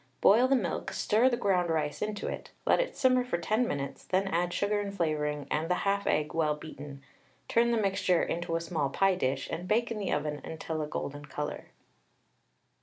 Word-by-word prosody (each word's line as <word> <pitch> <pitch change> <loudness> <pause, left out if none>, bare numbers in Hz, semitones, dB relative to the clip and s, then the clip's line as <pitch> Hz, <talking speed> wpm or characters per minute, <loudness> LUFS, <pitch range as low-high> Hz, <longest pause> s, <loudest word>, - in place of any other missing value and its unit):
Boil 235 +6 +6
the 270 - +4
milk, 185 -10 -2
stir 230 +5 +3
the 240 - 0
ground 180 -5 +1
rice 155 -2 -1
into 210 -1 -3
it; - - -5 0.2
let - - +4
it - - -1
simmer 255 -1 +4
for 245 -8 -1
10 215 +8 +1
minutes, 140 -5 -4
then 190 +1 0
add 175 -1 0
sugar 205 +3 0
and 200 -1 -4
flavouring 150 -4 -1
and 160 +2 0
the 180 - +3
1/2 200 0 +1
egg 150 +1 +1
well 155 -2 +1
beaten; 145 -2 -9 0.4
turn 235 +1 +3
the 235 - +2
mixture 190 -4 +2
into 170 0 -2
a 165 - 0
small 160 -5 -1
pie 195 +6 +3
dish, 135 -6 -1
and 175 +2 -4
bake 230 +3 +1
in 220 - -3
the 200 - -2
oven 150 0 -1
until 160 0 -4
a 150 - -2
golden 145 -1 -5
colour. 150 0 -5
175 Hz, 200 wpm, -30 LUFS, 150-205 Hz, 0.4 s, Boil